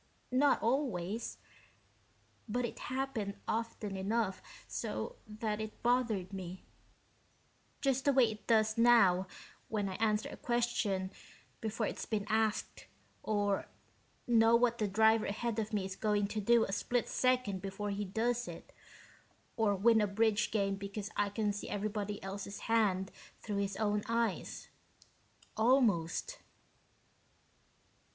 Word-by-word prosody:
Not 275 +3 +4
always 230 -5 -1 1.1
but 245 +3 0
it 235 - -6
happened 255 -6 -2
often 220 -3 -2
enough 195 0 -1 0.3
so - - -4
that 215 0 -3
it 215 0 -7
bothered 230 -6 +1
me, 185 -1 -6 1.2
just 270 -1 +1
the 285 - +5
way 255 -4 +4
it 215 - -11
does 220 -1 +3
now 195 -6 +5 0.4
when 210 -2 -1
I 190 - -4
answer 215 -1 +1
a - - -8
question 235 -6 0 0.5
before 220 0 -2
it's - - -4
been 210 -2 -1
asked, 220 -1 0 0.3
or 205 -2 0 0.6
know 230 -1 +5
what 235 0 +3
the 210 - +1
driver 220 +2 +4
ahead 225 +2 -2
of 215 0 -2
me 205 -3 0
is 190 0 -5
going 210 -1 +1
to 215 - -2
do 235 +2 +5
a 195 - -3
split 240 +4 0
second 255 -7 +1
before 200 +1 -4
he 200 +1 -2
does 235 +5 -1
it, - - -9 0.8
or 220 -3 +2
win 220 +3 +5
a 210 - +2
bridge 215 +2 +2
game 195 -2 0
because 200 +1 -5
I 205 0 +1
can 205 0 0
see 205 - -6
everybody 205 0 -3
else's 200 +1 -6
hand 205 -4 +1 0.3
through 210 -2 -4
his 200 -1 -1
own 210 -1 +1
eyes, 230 -4 -1 0.9
almost." 230 - +2
215 Hz, 135 wpm, -33 LUFS, 200-235 Hz, 1.2 s, the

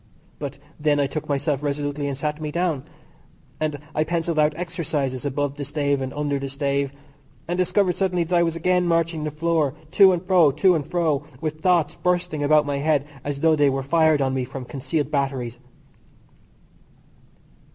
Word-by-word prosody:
But - - -5 0.2
then 150 -1 +2
I 140 - +3
took 150 +2 -5
myself 140 0 0
resolutely 145 0 -2
and 140 -2 -3
sat 150 +2 -3
me 150 -1 -3
down, 160 -4 -1 0.7
and 155 -2 -1 0.2
I 155 - +2
pencilled 165 0 -1
out 150 0 +3
exercises 150 -7 -3
above 145 +1 -2
the 145 - -4
stave, 145 -1 0
and 130 0 -3
under 145 -1 -1
the 135 0 -4
stave; 140 0 -1 0.6
and 175 - -1
discovered 185 +1 +2
suddenly 180 -1 0
that 170 +2 -1
I 170 - +5
was 165 -1 +1
again 180 +1 +1
marching 165 -2 +1
the 155 - -1
floor, 155 -2 0 0.2
to 195 0 +7
and 180 0 -2
fro, 180 -5 +5
to 180 +6 +4
and 155 -5 -1
fro, 155 -5 0
with 155 0 -4
thoughts 170 -3 +3
bursting 175 -4 -1
about 150 +1 +4
my 145 -1 -1
head 145 -1 +1 0.2
as 145 0 -4
though 160 -1 +4
they 145 -2 +4
were 135 0 -1
fired 155 0 +3
on 130 0 0
me 130 -1 0
from 130 +1 -7
concealed 140 +3 -3
batteries. 135 -4 -2
150 Hz, 185 wpm, -23 LUFS, 140-165 Hz, 0.7 s, to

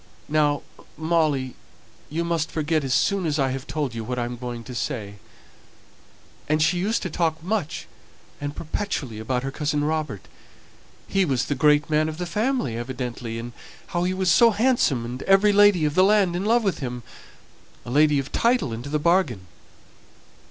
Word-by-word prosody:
Now, 150 -1 +2 0.3
Molly, 155 -6 +1 0.6
you 165 +3 -2
must 170 -2 -1
forget 155 -1 0
as 135 - -3
soon 195 +5 +2
as 150 -1 0
I've 135 -1 -1
told 140 -2 -2
you 115 -1 -4
what 125 +3 -4
I'm 120 0 -2
going 120 -1 -6
to 125 - -9
say; 110 -5 -4 1.3
and 155 0 +2
she 175 +3 +2
used 215 +5 0
to 185 - -2
talk 160 -1 0
so - - -14
much 195 -7 -2 0.6
and 145 0 -4
perpetually 150 - -4
about 125 +3 -2
her 135 - -3
cousin 150 0 -1
Robert 150 -9 -2 0.8
he 195 -1 +2
was 135 -8 0
the - - -1
great 150 +1 +3
man 155 0 +1
of 155 - -6
the 180 - -3
family, 210 - -1
evidently 120 -1 -5
and 120 +1 -6 0.4
how 175 0 +1
he 180 +1 0
was 185 -2 +2
so 235 +6 +6
handsome, 215 - +2
and 125 +2 -6
every 200 +2 +5
lady 205 -5 +5
of 150 - 0
the 185 - +5
land 195 -3 +3
in 185 +3 -2
love 230 +2 +3
with 195 -3 0
him, 125 -3 -5 0.8
a 120 - -6
lady 150 +2 +4
of 135 0 -3
title 235 - +1
into 120 +5 -6
the 150 - +1
bargain." 150 - +1
150 Hz, 180 wpm, -24 LUFS, 130-180 Hz, 1.3 s, so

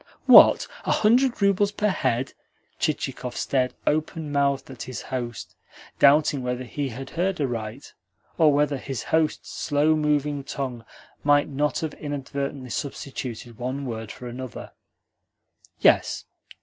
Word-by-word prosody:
"What, - - +8 0.2
a - - -1
hundred 235 +1 +3
roubles 200 +1 +3
per 210 +1 0
head?" 130 -9 -1 0.5
Chichikov 125 -1 -2
stared 130 -2 0
open 155 0 -1
mouthed 140 -1 0
at 130 - -10
his 130 -2 -5
host 120 -3 -5 0.4
doubting 145 -1 +5
whether 125 0 -3
he 135 +3 -4
had 130 +3 -8
heard 180 +2 -1
aright, 120 -2 -4 0.4
or 160 -3 +5
whether 145 0 +2
his 130 -1 -5
host's 160 -1 0
slow 150 +1 +1
moving 150 -2 0
tongue 130 -4 -5 0.4
might 145 0 +4
not 145 +1 -1
have 160 -2 -3
inadvertently 140 -2 -5
substituted 130 -5 -5
one 130 +3 -3
word 110 -3 -5
for 125 - -9
another. 125 0 -7 1.1
"Yes. - - +3
140 Hz, 130 wpm, -25 LUFS, 125-150 Hz, 1.1 s, What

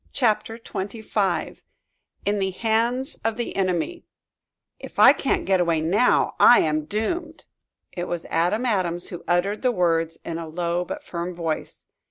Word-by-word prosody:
CHAPTER 225 -3 +1
XXV 200 -5 -3 0.6
IN 205 0 +1
THE 190 -1 0
HANDS 230 +6 -1
OF 225 0 -1
THE 240 - -4
ENEMY 190 - -1 0.8
"If - - -11
I - - +8
can't 385 -4 -1
get 190 -1 +2
away 170 -2 +2
now 190 +10 +2
I 245 - +8
am 155 -1 0
doomed!" 315 - -3 0.5
It 175 -1 -4
was 175 -1 -4
Adam 180 +9 +1
Adams 180 -6 0
who 175 - -8
uttered 180 +4 +1
the 255 - +2
words 165 -5 +1
in 165 0 -4
a 165 - -6
low 175 +2 -1
but 290 +6 -6
firm 175 - -5
voice. 165 -2 -4
190 Hz, 155 wpm, -24 LUFS, 170-225 Hz, 0.8 s, I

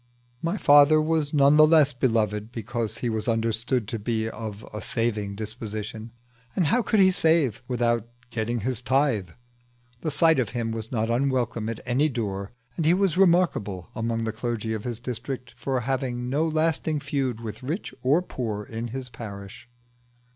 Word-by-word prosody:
My 170 +5 -1
father 145 -1 +6
was 155 -1 +1
none 145 0 +5
the 155 0 +8
less 155 -3 +5
beloved 110 -4 0
because 115 0 -3
he 125 - -2
was 110 +1 -2
understood 115 +1 0
to 115 - -3
be 110 +1 -1
of 110 -2 -6
a 105 - -5
saving 105 -4 -1
disposition, 110 +1 -6 0.5
and 180 - +2
how 240 +12 +3
could 215 -2 +1
he 190 -1 +6
save 160 - +2
without 120 -2 0 0.2
getting 115 0 -2
his 125 +1 -2
tithe? 130 - +1 0.7
The 155 - -2
sight 160 +1 +4
of 120 -5 0
him 115 -1 -1
was 110 0 -5
not 115 -2 0
unwelcome 120 -3 0
at 115 - -5
any 130 +5 +2
door, 100 -6 -3 0.2
and 165 - -1
he 165 +3 +5
was 190 -4 +2
remarkable 170 - +2
among 115 0 -2
the 110 -1 -2
clergy 115 -1 -3
of 110 -1 -5
his 120 -2 -4
district 125 +1 -5
for 130 -2 -2
having 125 -1 -2
no 155 +4 +2
lasting 155 -1 0
feud 135 -5 -2
with 115 +2 -7
rich 155 +10 -4
or 145 +8 +3
poor 110 - -4
in 115 +3 -5
his 130 +2 -6
parish. 100 -1 -9
120 Hz, 170 wpm, -25 LUFS, 110-145 Hz, 0.7 s, the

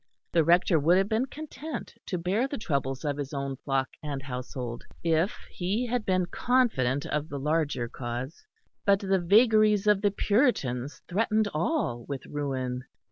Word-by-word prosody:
The 165 - +4
Rector 170 +1 +4
would 165 +5 +4
have 195 +1 +2
been 230 +4 +1
content 310 +2 -7
to 180 - -1
bear 190 +9 0
the 280 - -4
troubles 140 - -2
of 145 -1 -1
his 145 0 -4
own 140 -1 -3
flock 135 -1 0
and 140 -3 -4
household 125 -2 -5 0.2
if 165 +3 +2
he 200 +7 -1
had 245 -2 -2
been 185 -1 +2
confident 175 - +1
of 150 +1 -2
the 140 - -4
larger 150 -4 0
cause; 120 - -5 0.4
but 200 -2 +5
the 195 -1 +2
vagaries 215 +2 +5
of 210 -2 +4
the 205 - +4
Puritans 175 - 0
threatened 215 +2 +1
all 155 - 0
with 135 -2 -4
ruin. 130 -4 -3
165 Hz, 160 wpm, -28 LUFS, 135-210 Hz, 0.4 s, but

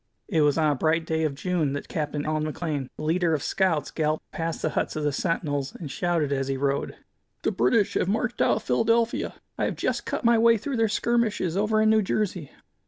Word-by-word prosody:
It 160 - +1
was 145 0 +3
on 155 -2 +3
a - - 0
bright 160 +3 +1
day 160 0 0
of 145 -3 -2
June 160 -3 -1
that 145 - -5
Capt. 150 -1 -3
Allan 155 +1 -1
McLane, 145 -6 -3
the - - -6
leader 165 +1 +2
of 145 - -4
scouts, 165 -7 0
galloped 155 -1 -2
past 165 -3 -3
the - - +1
huts - - -1
of 155 - -2
the 145 - +1
sentinels, 145 -3 -2
and 150 -5 -7
shouted 170 -4 0
as 135 -1 -1
he 135 -1 -1
rode: 140 +1 -1 0.5
"The - - +1
British 125 - +2
have - - +1
marched 225 +4 -1
out - - +4
of 220 - -4
Philadelphia! 230 +1 +1 0.2
I - - +2
have - - -2
just - - -2
cut - - -3
my 235 -1 +5
way 230 0 +5
through 265 +4 -3
their 225 -1 +2
skirmishers 215 -6 0
over 215 +2 +2
in 215 - +4
New 220 0 +4
Jersey!" 185 -6 -2
165 Hz, 225 wpm, -26 LUFS, 150-210 Hz, 0.5 s, my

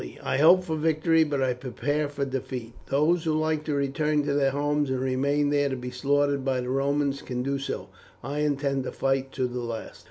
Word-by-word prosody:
I - - 0
hope 175 +5 +7
for 160 -3 -2
victory, 160 +1 +3
but 145 -3 -1
I 130 -1 +2
prepare 145 +4 -2
for 140 -1 -2
defeat; 130 -3 -5
those 155 +5 +2
who 160 - +1
like 155 0 0
to 150 - -1
return 145 +2 +1
to 145 0 -1
their 140 -1 +3
homes 145 +1 0
and 130 -1 0
remain 140 +3 +1
there 145 -1 +2
to 130 - -2
be 125 0 -6
slaughtered 140 +2 +1
by 130 -1 0
the 125 0 -4
Romans, 140 +1 0
can 125 -1 -4
do 140 +1 -1
so. 135 - -4 0.4
I 140 +4 -3
intend 140 -2 0
to - - -3
fight 135 0 0
to 130 - 0
the 125 0 -3
last." 115 -2 -6
140 Hz, 215 wpm, -26 LUFS, 130-150 Hz, 0.4 s, hope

